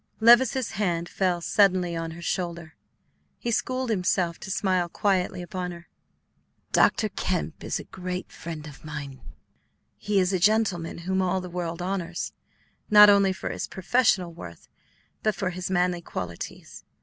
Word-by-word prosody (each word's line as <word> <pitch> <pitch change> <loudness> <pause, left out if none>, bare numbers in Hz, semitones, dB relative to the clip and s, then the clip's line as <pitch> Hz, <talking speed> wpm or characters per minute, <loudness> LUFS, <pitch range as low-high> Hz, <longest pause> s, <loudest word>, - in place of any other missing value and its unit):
Levice's 240 +2 +5
hand 175 -3 -1
fell 180 -2 0
suddenly 185 -2 +3
on 165 0 -3
her 170 - -9
shoulder. 170 -3 -3 0.6
He 235 - -3
schooled 255 +1 -1
himself 180 -3 0
to - - -8
smile 185 -2 +1
quietly 185 -2 0
upon 180 0 -4
her. 170 0 -10 0.8
"Dr. 220 - +4
Kemp 180 -4 -3
is - - -2
a - - -7
great 180 0 -6
friend 160 -2 -7
of 150 -2 -12
mine. 140 -3 -7 0.8
He 205 -1 +1
is 185 +1 +1
a 185 - +1
gentleman 200 -4 +2
whom 190 0 +1
all 185 0 +1
the 180 -1 -8
world 175 -1 -4
honors, 180 -2 -3 0.6
not 210 -1 +9
only 200 -1 +4
for 190 - -4
his - - -4
professional 190 -3 +1
worth, 85 - -11 0.5
but 215 -2 +1
for 190 -1 -2
his 185 +1 -5
manly 180 -1 +1
qualities. 90 - -7
180 Hz, 150 wpm, -26 LUFS, 170-195 Hz, 0.8 s, not